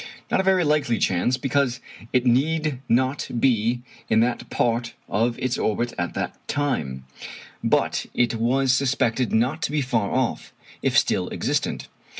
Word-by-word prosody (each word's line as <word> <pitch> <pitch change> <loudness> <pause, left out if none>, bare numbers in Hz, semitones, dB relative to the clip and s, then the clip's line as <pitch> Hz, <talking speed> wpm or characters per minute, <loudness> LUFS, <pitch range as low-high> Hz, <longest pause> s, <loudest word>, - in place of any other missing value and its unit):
Not - - +3
a - - +2
very 190 -1 +3
likely 150 -6 +2
chance, 95 +8 +1
because 135 -2 0 0.3
it 125 0 +2
need 150 +3 +1
not 130 +3 +1
be 120 -1 +2 0.3
in 110 - +4
that 120 0 -1
part 120 0 0
of 115 +3 0
its 130 -1 -1
orbit 115 +3 0
at 90 0 -3
the - - -2 0.2
time; 75 - -2 0.6
but - - +1
it 120 -2 +2
was 125 +4 +2
suspected 125 -2 +1
not 125 +8 +1
to 150 - -1
be 150 -1 +1
far 115 -5 0
off 130 -2 -1 0.3
if - - +2
still - - +2
existent. - - -2
125 Hz, 150 wpm, -24 LUFS, 115-140 Hz, 0.6 s, in